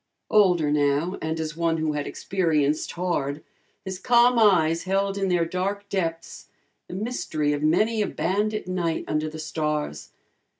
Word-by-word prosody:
Older 180 Hz, -8 st, +4 dB
now, 145 Hz, +5 st, +1 dB
and 160 Hz, +1 st, -2 dB
as 155 Hz, -1 st, -4 dB
one 165 Hz, -1 st, 0 dB
who 155 Hz, -1 st, -1 dB
had 145 Hz, -1 st, -3 dB
experienced 155 Hz, -5 st, 0 dB
hard, 155 Hz, -5 st, -2 dB, 0.4 s
his 190 Hz, -1 st, -5 dB
calm 240 Hz, +1 st, +4 dB
eyes 170 Hz, -6 st, +4 dB
held 195 Hz, +1 st, 0 dB
in 195 Hz, -1 st, -1 dB
their 175 Hz, -2 st, +2 dB
dark 195 Hz, +4 st, -3 dB
depths 165 Hz, -4 st, -3 dB, 0.4 s
the -, -, -7 dB
mystery 175 Hz, -9 st, -1 dB
of 145 Hz, -, -3 dB
many 210 Hz, +9 st, +2 dB
a 205 Hz, -, +1 dB
bandit 210 Hz, +2 st, -1 dB
night 175 Hz, -3 st, -1 dB
under 155 Hz, 0 st, -1 dB
the 155 Hz, -, -9 dB
stars. 150 Hz, -, -3 dB
170 Hz, 155 wpm, -25 LUFS, 155-195 Hz, 0.4 s, Older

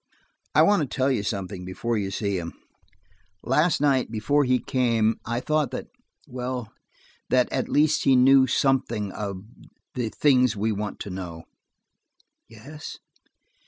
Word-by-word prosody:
"I -, -, +7 dB
want 205 Hz, -3 st, +4 dB
to 145 Hz, -, -1 dB
tell 130 Hz, +2 st, 0 dB
you 125 Hz, -, 0 dB
something 100 Hz, -3 st, -4 dB
before 105 Hz, +6 st, -3 dB
you 100 Hz, -3 st, -1 dB
see 100 Hz, -1 st, -2 dB
him. 85 Hz, -1 st, -6 dB, 0.9 s
Last 150 Hz, +6 st, +2 dB
night, 140 Hz, -3 st, +2 dB
before 140 Hz, +7 st, +1 dB
he 125 Hz, 0 st, +3 dB
came, 120 Hz, -4 st, +1 dB
I 120 Hz, +1 st, -1 dB
thought 150 Hz, 0 st, 0 dB
that–well, 125 Hz, -, -7 dB, 0.6 s
that 125 Hz, -1 st, +3 dB
at 130 Hz, -, -1 dB
least 155 Hz, +1 st, +2 dB
he 135 Hz, -, +5 dB
knew 130 Hz, +1 st, +6 dB
something 120 Hz, -6 st, 0 dB
of–the 105 Hz, +4 st, -7 dB
things 125 Hz, -3 st, +3 dB
we 110 Hz, +2 st, 0 dB
want 105 Hz, 0 st, -4 dB
to 100 Hz, -, -6 dB
know." 85 Hz, -3 st, -7 dB, 1.1 s
"Yes?" 135 Hz, +8 st, -10 dB
125 Hz, 135 wpm, -25 LUFS, 105-135 Hz, 1.1 s, I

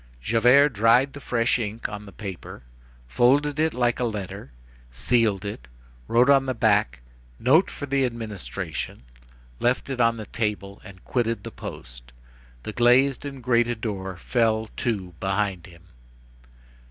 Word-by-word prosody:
Javert 120 Hz, -, +4 dB
dried 120 Hz, +4 st, +3 dB
the 145 Hz, -, -8 dB
fresh 120 Hz, -2 st, +1 dB
ink 110 Hz, 0 st, -4 dB
on 105 Hz, 0 st, -8 dB
the -, -, -10 dB
paper, 95 Hz, -, -8 dB, 0.4 s
folded 140 Hz, -, +2 dB
it 160 Hz, +1 st, +2 dB
like 120 Hz, -2 st, 0 dB
a -, -, 0 dB
letter, 100 Hz, -, -5 dB, 0.4 s
sealed 100 Hz, -, +1 dB
it, 80 Hz, -12 st, -6 dB, 0.4 s
wrote 120 Hz, +2 st, +4 dB
on 135 Hz, -1 st, +4 dB
the 130 Hz, -, -1 dB
back: 105 Hz, -, +2 dB, 0.4 s
Note 150 Hz, +10 st, +4 dB
for 145 Hz, -, -6 dB
the 140 Hz, 0 st, +1 dB
administration, 100 Hz, -, -5 dB, 0.6 s
left 125 Hz, +3 st, 0 dB
it 125 Hz, -2 st, -1 dB
on 115 Hz, 0 st, +3 dB
the 110 Hz, -, -6 dB
table, 100 Hz, -3 st, -4 dB
and 95 Hz, -3 st, -14 dB
quitted 115 Hz, -2 st, -1 dB
the -, -, -7 dB
post. -, -, -10 dB, 0.5 s
The 110 Hz, -, -6 dB
glazed 125 Hz, +4 st, +3 dB
and 135 Hz, -3 st, -7 dB
grated 120 Hz, -1 st, +1 dB
door 95 Hz, -5 st, -4 dB
fell 110 Hz, +1 st, 0 dB
to 100 Hz, -7 st, -2 dB
behind 95 Hz, -2 st, -1 dB
him. 85 Hz, -2 st, -16 dB
115 Hz, 145 wpm, -24 LUFS, 100-125 Hz, 0.6 s, Javert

